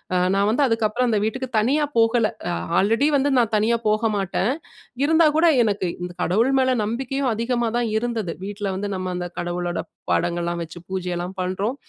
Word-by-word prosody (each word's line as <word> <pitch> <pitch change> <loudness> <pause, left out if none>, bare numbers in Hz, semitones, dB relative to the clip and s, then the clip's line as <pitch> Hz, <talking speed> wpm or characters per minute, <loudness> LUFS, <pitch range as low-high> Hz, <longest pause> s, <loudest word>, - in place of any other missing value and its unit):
அ - - +3 0.2
நான் 200 +1 +2
வந்து 250 +6 +2
அதுக்கப்புறம் 225 +2 +1
அந்த 220 - +2
வீட்டுக்கு 260 +4 -3
தனியா 275 +8 +2
போகல. 230 0 +4 0.2
அ - - -1 0.3
ஆல்ரெடி 225 +8 +2
வந்து 280 +1 +1
நான் 230 -3 +2
தனியா 225 +3 +2
போக 215 +2 +2
மாட்டன். 195 +3 0 0.5
இருந்தா 320 +3 +4
கூட 330 - +4 0.2
எனக்கு 205 -4 0
இந்த 180 0 -4
கடவுள் 225 +9 +2
மேல 260 0 +3
நம்பிக்கையும் 260 +4 -2
அதிகமா 235 +1 -1
தான் 240 -1 0
இருந்துது. 225 -6 -2
வீட்ல 205 0 -4
வந்து 205 +2 -3
நம்ம 185 -1 -3
அந்த 175 0 -3
கடவுளோட 175 0 -2 0.3
பாடங்கள்லாம் 170 0 0
வச்சு 165 +2 -10
பூஜையெல்லாம் 180 -1 -3
பண்றோம். 190 +7 -2
215 Hz, 170 wpm, -22 LUFS, 185-240 Hz, 0.5 s, போகல